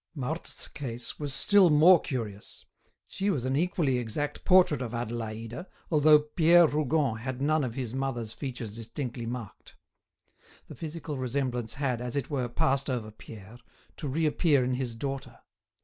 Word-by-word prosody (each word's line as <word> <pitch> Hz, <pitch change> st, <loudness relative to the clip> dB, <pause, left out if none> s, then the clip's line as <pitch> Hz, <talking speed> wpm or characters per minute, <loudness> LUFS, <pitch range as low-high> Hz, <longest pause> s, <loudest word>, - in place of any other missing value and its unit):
Marthe's 155 Hz, +4 st, -3 dB
case 125 Hz, -4 st, -6 dB
was 145 Hz, -2 st, -3 dB
still 195 Hz, +6 st, +5 dB
more 160 Hz, +3 st, +7 dB
curious; 110 Hz, -6 st, -6 dB, 0.4 s
she 195 Hz, +2 st, -2 dB
was 135 Hz, -11 st, -1 dB
an 130 Hz, +1 st, 0 dB
equally 150 Hz, -5 st, +1 dB
exact 135 Hz, +6 st, -3 dB
portrait 180 Hz, -7 st, +5 dB
of 120 Hz, -2 st, -4 dB
Adélaïde, 115 Hz, -, -5 dB, 0.2 s
although 155 Hz, -1 st, +7 dB
Pierre 165 Hz, +3 st, +5 dB
Rougon 150 Hz, -4 st, +1 dB
had 125 Hz, +2 st, -5 dB
none 150 Hz, +2 st, +2 dB
of 120 Hz, -3 st, -3 dB
his 125 Hz, -4 st, -4 dB
mother's 125 Hz, -5 st, -3 dB
features 120 Hz, -3 st, -6 dB
distinctly 115 Hz, +1 st, -5 dB
marked; 115 Hz, -4 st, -8 dB, 0.9 s
the -, -, -9 dB
physical 155 Hz, -3 st, -6 dB
resemblance 125 Hz, -2 st, -2 dB
had, 130 Hz, -4 st, -1 dB
as 125 Hz, +1 st, -4 dB
it 140 Hz, +1 st, -2 dB
were, 130 Hz, -4 st, -1 dB
passed 135 Hz, +3 st, 0 dB
over 115 Hz, -4 st, -3 dB
Pierre, 110 Hz, +1 st, -12 dB, 0.4 s
to 150 Hz, -, -5 dB
reappear 150 Hz, 0 st, +2 dB
in 125 Hz, +1 st, 0 dB
his 125 Hz, -2 st, -3 dB
daughter. 135 Hz, +3 st, -5 dB
130 Hz, 150 wpm, -28 LUFS, 120-150 Hz, 0.9 s, more